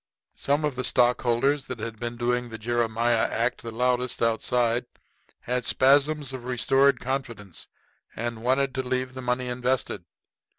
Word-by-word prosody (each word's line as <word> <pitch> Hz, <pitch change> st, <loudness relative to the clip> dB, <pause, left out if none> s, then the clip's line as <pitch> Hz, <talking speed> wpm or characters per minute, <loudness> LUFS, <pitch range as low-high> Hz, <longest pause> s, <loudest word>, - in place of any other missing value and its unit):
Some 145 Hz, +2 st, 0 dB
of 145 Hz, -3 st, -1 dB
the 125 Hz, -, -3 dB
stockholders 125 Hz, +3 st, +2 dB
that 130 Hz, -, -6 dB
had 110 Hz, 0 st, -6 dB
been 120 Hz, 0 st, -4 dB
doing 125 Hz, 0 st, 0 dB
the 115 Hz, -, -6 dB
Jeremiah 115 Hz, 0 st, +1 dB
act 120 Hz, +2 st, -1 dB
the 115 Hz, -, -6 dB
loudest 125 Hz, +2 st, 0 dB
outside 120 Hz, +1 st, +1 dB, 0.5 s
had 125 Hz, +1 st, -1 dB
spasms 140 Hz, +1 st, +3 dB
of 130 Hz, -2 st, -6 dB
restored 135 Hz, +1 st, +3 dB
confidence 120 Hz, -8 st, -5 dB, 0.5 s
and 115 Hz, 0 st, -4 dB
wanted 130 Hz, +2 st, +1 dB
to 130 Hz, -, -1 dB
leave 130 Hz, 0 st, -2 dB
the 130 Hz, -, -6 dB
money 125 Hz, 0 st, -1 dB
invested. 125 Hz, +1 st, -1 dB
125 Hz, 145 wpm, -26 LUFS, 120-130 Hz, 0.5 s, spasms